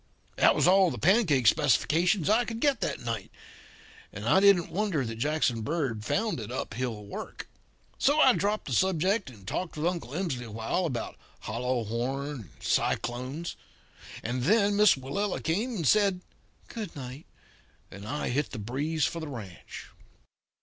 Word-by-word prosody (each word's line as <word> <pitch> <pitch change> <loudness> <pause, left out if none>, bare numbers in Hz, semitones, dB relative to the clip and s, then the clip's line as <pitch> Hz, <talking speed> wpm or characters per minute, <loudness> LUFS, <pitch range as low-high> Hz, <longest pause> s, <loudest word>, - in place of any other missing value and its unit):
"That - - +5
was - - +2
all 190 0 +6
the - - -5
pancake 170 - +3
specifications 155 - +3
I 220 +3 +4
could 230 -1 -5
get 280 -2 +2
that - - -2
night. 115 -4 -4 0.8
I 110 - +2
didn't 195 -4 +4
wonder 180 -7 0
that 115 -1 -5
Jackson 135 -3 0
Bird 135 -5 -2
found 215 - -1
it 110 - -6
uphill 110 -3 -4
work. 100 - -7 0.5
So 290 +3 +3
I 260 -4 +7
dropped 210 0 -1
the 135 - -4
subject 190 - +1
and 100 -6 -15
talked 180 -3 -3
with 150 - -2
Uncle 170 -7 -2
Emsley 170 -8 -2
for - - -9
a - - -10
while 115 +11 -1
about 125 -6 -4 0.2
hollow 120 +2 -2
horn 125 +6 -2
and 125 - -7
cyclones. 130 +8 -1 0.7
And 125 +2 -2
then 205 - +3
Miss 210 -1 +6
Willella 160 +10 -2
came 215 +10 -1
and 165 -8 -1
said 200 -1 +3 0.5
'Good 215 -7 -7
night,' 135 +2 -8 0.6
and 100 +2 -9
I 145 +6 -2
hit 135 +3 0
the - - -7
breeze 140 +8 -1
for 170 - -3
the 160 - -5
ranch. 105 -10 -9
150 Hz, 165 wpm, -28 LUFS, 120-190 Hz, 0.8 s, I